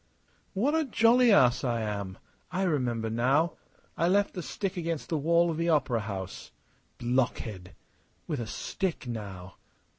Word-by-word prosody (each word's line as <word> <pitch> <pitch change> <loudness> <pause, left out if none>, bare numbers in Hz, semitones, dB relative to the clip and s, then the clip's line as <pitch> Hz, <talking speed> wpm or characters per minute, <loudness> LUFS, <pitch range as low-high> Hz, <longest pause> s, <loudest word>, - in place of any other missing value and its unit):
"What 255 +10 +2
a 320 0 +3
jolly 240 -1 +4
ass 130 -9 +5
I 120 -3 0
am! 100 -3 -4 0.3
I 185 +2 0
remember 125 -10 0
now. 130 +9 +2 0.4
I 170 - +1
left 200 +2 +2
the 180 - -4
stick 195 +3 -3
against 165 -3 -3
the 160 - 0
wall 170 +3 +3
of 160 - -4
the 170 +1 0
opera 130 -7 +2
house. 100 -7 -6 0.5
Blockhead! 120 -6 -1 0.5
With 150 -5 -3
a 115 - -4
stick, 185 - -3
now!... 100 -6 -7
140 Hz, 150 wpm, -29 LUFS, 115-175 Hz, 0.5 s, ass